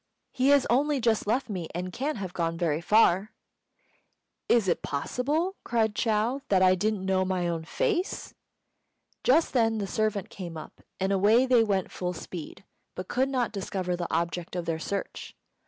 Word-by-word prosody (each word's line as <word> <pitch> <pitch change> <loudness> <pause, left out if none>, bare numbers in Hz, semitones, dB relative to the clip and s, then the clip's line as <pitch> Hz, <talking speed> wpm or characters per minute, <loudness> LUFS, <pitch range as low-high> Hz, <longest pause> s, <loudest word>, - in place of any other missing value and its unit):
He 255 +1 +1
has 285 -2 +5
only 280 +3 +2
just 225 -3 +1
left 245 +4 +1
me, 180 -7 -5
and 180 +1 -4
can't 285 +2 -2
have 190 -3 -5
got 165 -2 -1
very 165 -2 0
far." 205 +1 +3 1.2
"Is 230 -5 +4
it 175 - +1
possible," 290 - -1
cried 225 -2 +1
Chou, 225 +5 0
"that 190 -2 +4
I 185 0 +6
didn't 200 +1 -1
know 190 -1 +2
my 185 -2 -1
own 165 -1 -3
face?" 410 - -2 0.9
Just 310 +6 +3
then 225 -3 +2
the 205 - -2
servant 210 0 -1
came 170 -4 -7
up, 155 - -11 0.2
and 190 +1 0
away 210 +6 +4
they 250 -3 +5
went 195 -4 -1
full 180 0 -3
speed, 175 +2 -8 0.3
but 185 - -6
could 260 +2 +1
not 255 -3 0
discover 190 -3 -3
the 175 -1 -4
object 170 +1 -2
of 175 -1 -3
their 165 -1 -2
search. 200 +4 -5
200 Hz, 170 wpm, -27 LUFS, 180-245 Hz, 1.2 s, I